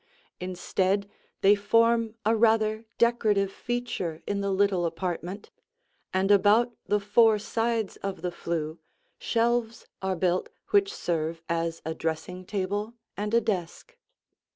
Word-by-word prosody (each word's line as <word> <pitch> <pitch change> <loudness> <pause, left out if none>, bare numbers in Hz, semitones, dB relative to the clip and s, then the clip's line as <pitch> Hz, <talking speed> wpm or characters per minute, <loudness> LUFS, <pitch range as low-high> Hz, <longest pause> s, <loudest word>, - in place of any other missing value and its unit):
Instead, 185 +2 -1 0.3
they 195 +1 +7
form 230 +2 +2
a 220 +1 +4
rather 220 0 +2
decorative 215 -5 +2
feature 235 -9 -3
in 200 0 -1
the 200 - -1
little 190 -3 +2
apartment, 175 +3 -4 0.6
and 190 +2 +2
about 215 +4 +4
the 210 - +2
four 215 +2 +4
sides 225 0 -1
of 195 -4 -5
the 180 - -1
flue 165 -2 -3 0.4
shelves 235 0 0 0.2
are 190 -1 -1
built 180 +1 0 0.2
which 400 -1 +4
serve 165 - -2
as 165 0 -2
a 160 - -2
dressing 165 +3 -4
table 205 +3 -2 0.2
and 210 +1 -3
a 235 - +5
desk. 195 - -3
200 Hz, 130 wpm, -27 LUFS, 180-225 Hz, 0.6 s, they